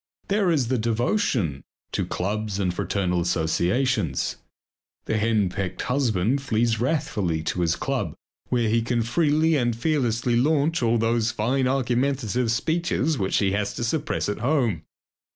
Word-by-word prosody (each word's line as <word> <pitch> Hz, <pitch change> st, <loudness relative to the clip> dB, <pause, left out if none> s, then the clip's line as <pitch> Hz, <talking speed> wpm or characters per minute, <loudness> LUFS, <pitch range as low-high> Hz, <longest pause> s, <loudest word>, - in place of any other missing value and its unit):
There 200 Hz, -2 st, +2 dB
is 145 Hz, -8 st, +2 dB
the 130 Hz, -2 st, +1 dB
devotion 115 Hz, -, 0 dB, 0.3 s
to -, -, -1 dB
clubs 105 Hz, +1 st, -2 dB
and 90 Hz, -3 st, 0 dB
fraternal 90 Hz, -1 st, -1 dB
associations. 90 Hz, -, 0 dB, 0.7 s
The 110 Hz, -, 0 dB
henpecked 100 Hz, -4 st, 0 dB
husband 125 Hz, -1 st, +1 dB
flees 115 Hz, -3 st, 0 dB
wrathfully 105 Hz, -, -1 dB
to 90 Hz, -, -2 dB
his 85 Hz, 0 st, +2 dB
club 135 Hz, -, -2 dB, 0.3 s
where 120 Hz, -2 st, +1 dB
he 115 Hz, +2 st, +2 dB
can 120 Hz, 0 st, 0 dB
freely 155 Hz, +5 st, +2 dB
and 120 Hz, -4 st, +1 dB
fearlessly 120 Hz, -3 st, 0 dB
launch 150 Hz, +5 st, +2 dB
all 120 Hz, 0 st, +2 dB
those 115 Hz, 0 st, +1 dB
fine 125 Hz, +4 st, 0 dB
argumentative 125 Hz, -2 st, 0 dB
speeches 160 Hz, +1 st, 0 dB
which 95 Hz, -1 st, +1 dB
he 95 Hz, -2 st, +2 dB
has 100 Hz, +1 st, -1 dB
to -, -, -3 dB
suppress 145 Hz, +6 st, -1 dB
at 105 Hz, -, -3 dB
home. 120 Hz, -, 0 dB
115 Hz, 140 wpm, -24 LUFS, 100-135 Hz, 0.7 s, There